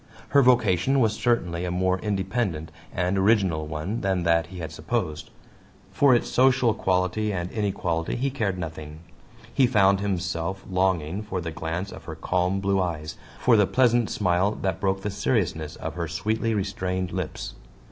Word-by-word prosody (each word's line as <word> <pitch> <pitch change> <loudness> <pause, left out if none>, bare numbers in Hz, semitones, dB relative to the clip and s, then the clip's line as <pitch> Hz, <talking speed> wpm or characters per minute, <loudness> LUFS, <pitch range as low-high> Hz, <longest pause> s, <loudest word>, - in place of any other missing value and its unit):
Her 140 - +5
vocation 125 0 +3
was 110 -4 +3
certainly 90 -8 0
a 90 - -2
more 95 +1 +1
independent 95 -5 -2 0.2
and 90 +2 0
original 95 -7 +2
one 80 +9 -3
than 95 -3 0
that 85 -2 +2
he 95 +1 -10
had 80 -2 -5
supposed; 80 -4 -3 0.6
for 140 -3 +5
its 120 - 0
social 130 -2 +3
quality 95 +3 0
and 90 -2 -3
inequality 90 -6 -1
he 135 +3 -1
cared 105 -8 -1
nothing. 80 -2 -7 0.5
He 135 -3 +4
found 100 -5 +4
himself 95 -1 -2
longing 95 -1 0
for 105 -3 -4
the 85 -2 -4
glance 85 +4 -4
of - - -11
her - - -6
calm 90 +1 0
blue 95 0 +1
eyes, 80 -3 -3 0.2
for 125 - +4
the 105 -3 +4
pleasant 120 -3 +3
smile 95 +1 +1
that 95 -3 -1
broke 95 -1 0
the 105 - -2
seriousness 90 - -1
of - - -5
her 85 0 -3
sweetly 110 +7 -1
restrained 95 -2 -2
lips. 90 -4 -4
95 Hz, 165 wpm, -25 LUFS, 85-105 Hz, 0.6 s, Her